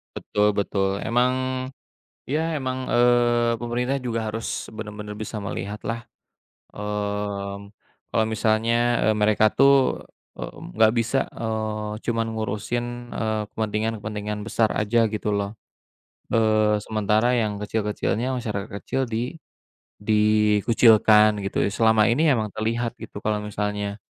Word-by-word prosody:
Betul 105 0 +1
betul. 100 -1 0
Emang, 125 +2 +2 0.9
ya, 160 +3 -1
emang, 130 -1 -3
eee, 120 -1 +3
pemerintah 125 +3 -1
juga 115 -3 -2
harus 115 0 -3
benar-benar 105 -1 -7
bisa 110 +1 -6
melihatlah, 105 +4 -5 0.7
eee, 105 -1 -3 0.5
kalau 110 -1 +2
misalnya, 115 +2 +1
eee, 110 - +3
mereka 105 0 +4
tuh 135 +3 +4 0.3
e - - -6 0.3
nggak 110 0 +5
bisa, 115 +3 +1
eee, 110 -1 -3
cuma 115 -1 0
ngurusin, 110 +2 -2 0.3
eee, 110 -1 -1
kepentingan-kepentingan 105 -1 -3
besar 115 0 +1
aja, 110 +2 +2
gitu 105 0 -2
loh. 100 +1 -2 0.8
Eee, 110 -2 +3
sementara 110 +3 +1
yang 105 -2 -1
kecil-kecilnya, 110 +4 -1
masyarakat 105 -5 -3 0.2
kecil 135 0 -1
di 120 +7 -3 0.6
dikucilkan, 105 0 +4
gitu - - -1
ya, - - +2
selama 110 +1 +3
ini 145 +8 +2
emang 110 -3 -1
terlihat, 115 +2 -1
gitu, 110 -2 -9
kalau 105 0 0
misalnya, 105 0 -3
110 Hz, 115 wpm, -24 LUFS, 105-120 Hz, 0.9 s, nggak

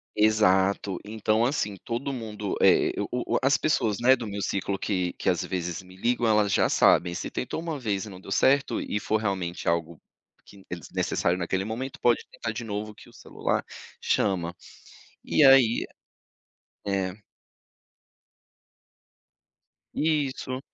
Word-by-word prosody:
Exato. 100 -3 +2
Então, 110 +1 +1
assim 105 -7 -1
todo 120 +4 -3
mundo, 105 -5 -4
eh, - - +5
o - - -1 0.3
o - - +3
o - - +3
as 135 +1 +4
pessoas, 120 -10 0
né. 130 +2 +6
Do 120 -3 -6
meu 100 0 -4
ciclo 100 0 -2
que 90 -3 -1
que, - - -1
às 90 -3 +1
vezes, 90 -1 -3
me 90 0 -16
ligam, 120 +4 0
elas 105 -2 +3
já - - +3
sabem 85 -1 +4
se - - -4
tentou 130 - -4
1 165 -3 -4
vez 105 -5 -2
e - - -9
não 95 -2 -10
deu 95 - -11
certo 140 +6 +2
e 105 - -2
for 110 - 0
realmente 95 -5 -3
algo 85 -1 -2 0.4
que 100 -1 -16
é - - -3
desnecessário 85 +1 -1
naquele 95 +2 -1
momento, 120 +6 -5
pode 120 -1 +2
tentar 115 - -5
de 110 +2 -5
novo 105 0 -4
que - - -16
o - - -20
celular - - -2 0.4
chama. 85 -3 0 0.7
E - - +3
aí, 130 -4 +6 1.0
eh 95 -2 -1 2.8
Isso! 140 -4 -1
105 Hz, 155 wpm, -26 LUFS, 95-120 Hz, 2.8 s, né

